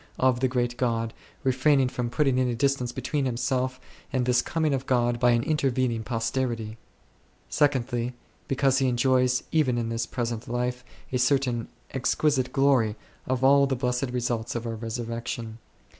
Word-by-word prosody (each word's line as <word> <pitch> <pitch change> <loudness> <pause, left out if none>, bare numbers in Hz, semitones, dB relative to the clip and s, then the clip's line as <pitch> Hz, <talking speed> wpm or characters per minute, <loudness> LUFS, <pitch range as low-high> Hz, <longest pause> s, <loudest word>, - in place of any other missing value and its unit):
of 130 -2 +3
the 130 - +2
great 120 -1 -1
God, 115 -2 0 0.3
refraining 130 0 +3
from 125 -1 -3
putting 130 0 +2
any 125 -2 +1
distance 135 -1 0
between 135 +3 -2
himself 130 +1 -1 0.3
and 130 -2 0
this 125 0 +3
coming 155 0 0
of 135 0 -2
God 120 -2 +2
by 125 - +4
an 120 -1 +3
intervening 130 -6 0
posterity: 115 -1 -2 0.7
secondly, 125 -4 +1 0.3
because 135 0 +2
he 135 - +2
enjoys 125 0 +2
even 140 -7 +2
in 115 -1 -1
this 115 0 -2
present 115 -1 -3
life 125 +1 -2 0.3
a 125 - +1
certain 125 -3 +1 0.2
exquisite 130 0 +1
glory 135 -6 +3 0.3
of 130 0 -1
all 140 +1 +6
the 135 - 0
blessed 125 +1 -1
results 120 -2 -2
of 120 0 -3
our 115 - -3
resurrection. 115 0 -5
125 Hz, 155 wpm, -26 LUFS, 120-130 Hz, 0.7 s, all